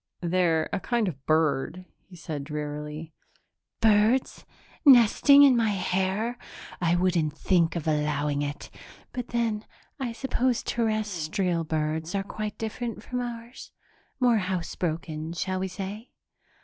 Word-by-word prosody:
"They're 170 -2 +2
a - - 0
kind 235 0 0
of 140 -7 -5
bird," 155 +3 +1 0.2
he 185 - -13
said 155 -4 -5
drearily. 150 +1 -5 0.7
"Birds 220 +4 +3 0.4
nesting 280 +1 +7
in 270 -3 +7
my 230 -2 +2
hair! 195 +4 -1 0.4
I 170 0 +3
wouldn't 170 -4 +1
think 175 -3 +2
of 160 -2 -3
allowing 150 -1 0
it. 145 0 -5 0.4
But 250 -1 -4
then 230 -3 -1 0.4
I 255 -3 -2
suppose 255 -1 0
Terrestrial 195 -6 -1
birds 160 +2 -2
are 195 - 0
quite 210 +1 -5
different 225 +1 -4
from 250 - -3
ours? 240 0 -8 0.5
More 245 -3 +4
housebroken, 170 -3 -3
shall 185 +3 -1
we 190 - -1
say?" 200 +5 -7
185 Hz, 125 wpm, -27 LUFS, 160-225 Hz, 0.7 s, nesting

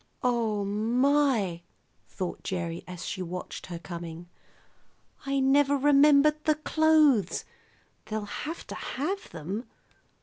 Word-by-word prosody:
"Oh, 225 -5 +1
my!" 230 -2 +1 0.5
thought 185 -2 -5
Gerry 170 -2 -4
as 180 -2 -7
she 185 - -4
watched 180 0 -6
her 175 -2 -5
coming. 170 0 -8 1.0
"I 275 0 +1
never 280 +1 +4
remembered 290 +2 +5
the 310 - +4
clothes. 305 - +3 0.6
They'll 215 -1 -3
have 310 +10 -6
to - - -8
have 375 +9 -4
them. 185 +9 -6
235 Hz, 110 wpm, -28 LUFS, 180-290 Hz, 1.0 s, remembered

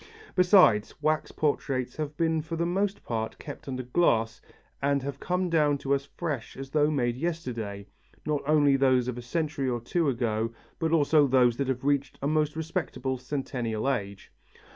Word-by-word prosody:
Besides, 180 - +5
wax 155 0 +1
portraits 135 -4 -1
have 150 -1 -4
been 160 -1 +1
for 160 +2 -5
the 170 +1 0
most 195 +3 -1
part 110 -2 -3
kept 145 -2 -9
under 130 -1 -3
glass 115 -5 +1 0.4
and 140 -1 +1
have 140 0 -5
come 180 0 -1
down 150 -4 +2
to 140 0 -1
us 140 0 0
as - - -27
fresh 150 -9 -4
as 135 0 -7
though 150 0 +3
made 120 -5 0
yesterday, 120 -11 -4 0.4
not 150 -2 0
only 145 -2 +4
those 130 -2 +3
of 125 -1 -3
a - - -6
century 140 +1 -2
or 120 -1 -1
two 155 +7 0
ago 115 -3 -1 0.3
but 160 -1 0
also 150 -2 +4
those 125 -2 +4
that 140 - -1
have 130 -1 -2
reached 140 -2 0
a 140 - -2
most 150 0 +1
respectable 145 -6 -3
centennial 125 -4 -3
age. 100 -7 -3
140 Hz, 180 wpm, -28 LUFS, 125-155 Hz, 0.4 s, Besides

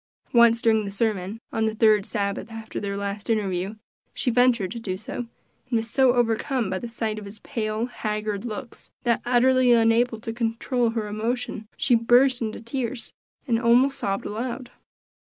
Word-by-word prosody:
Once 235 -1 +5
during 220 -1 +3
the 200 - -4
sermon, 205 0 -2
on 225 0 0
the 220 0 -1
third 215 -2 +4
Sabbath 200 0 -2
after 225 0 -6
their 200 -1 -3
last 200 +1 -4
interview, 195 -2 -1 0.4
she 250 - 0
ventured 235 -6 +3
to 235 - -5
do 185 -5 -4
so, 245 +3 -6 0.4
and - - -8
was 225 0 -3
so 260 -1 +4
overcome 235 -1 0
by 185 - -1
the 240 - -6
sight 220 -2 -3
of 210 - -10
his 200 +2 -10
pale, 220 -3 -2
haggard 215 -4 -3
looks, 240 +1 -7
that 235 -2 +1
utterly 250 0 +4
unable 230 0 +3
to 225 0 -5
control 235 +1 0
her 225 -2 -2
emotion, 220 +1 -3
she 255 - +2
burst 245 +2 +4
into 220 -1 -3
tears, 240 +1 -4 0.3
and 230 -2 +2
almost 250 +3 +4
sobbed 195 0 -2
aloud. 245 +3 -4
225 Hz, 170 wpm, -25 LUFS, 215-245 Hz, 0.4 s, Once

